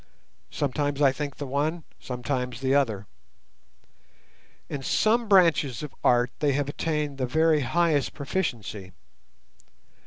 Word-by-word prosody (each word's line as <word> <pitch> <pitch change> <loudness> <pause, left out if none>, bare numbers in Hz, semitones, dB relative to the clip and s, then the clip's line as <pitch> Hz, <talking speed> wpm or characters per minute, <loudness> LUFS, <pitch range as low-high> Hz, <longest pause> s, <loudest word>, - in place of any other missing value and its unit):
Sometimes 145 0 -1
I 140 -2 +5
think 145 0 -5
the 145 - -5
one, 150 +5 -1 0.2
sometimes 125 -1 -3
the 135 0 +1
other. 110 -8 +1 1.6
In 140 - -5
some 225 - +2
branches 165 - +3
of 150 - -7
art 120 +1 +3
they 145 -2 +2
have 145 0 0
attained 150 -1 -2
the 130 - 0
very 160 +3 +3
highest 150 +2 +1
proficiency. 120 - -4
140 Hz, 120 wpm, -26 LUFS, 125-155 Hz, 1.6 s, I